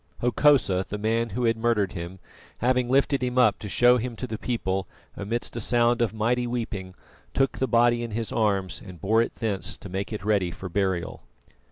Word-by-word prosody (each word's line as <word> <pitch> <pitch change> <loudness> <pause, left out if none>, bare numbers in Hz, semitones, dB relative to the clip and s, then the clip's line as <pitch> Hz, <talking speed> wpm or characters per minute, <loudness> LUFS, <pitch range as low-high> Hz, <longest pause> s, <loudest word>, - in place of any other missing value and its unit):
Hokosa, 120 -6 +3
the 105 - -3
man 115 +2 0
who 120 +5 -3
had 115 -1 +3
murdered 110 -4 +1
him, 85 0 -7 0.4
having 125 0 +1
lifted 135 +1 +2
him 125 0 -2
up 125 -5 +4
to 105 - -7
show 125 +4 +5
him 120 0 -4
to 130 - -5
the 110 -3 -5
people, 95 -6 -2 0.3
amidst 115 +5 -3
a 120 - -3
sound 120 +2 +2
of 120 - +2
mighty 120 +3 0
weeping, 110 -6 -4 0.4
took 135 0 +1
the 130 - +1
body 120 0 +3
in 120 - -4
his 110 +1 -4
arms 100 -4 0
and 90 -3 -11
bore 110 +7 +3
it 115 - -2
thence 105 -5 -3
to 100 - -10
make 95 +4 -4
it 105 -3 -5
ready 100 -4 +2
for 95 +2 -7
burial. 95 -2 -1
115 Hz, 200 wpm, -26 LUFS, 100-120 Hz, 0.4 s, show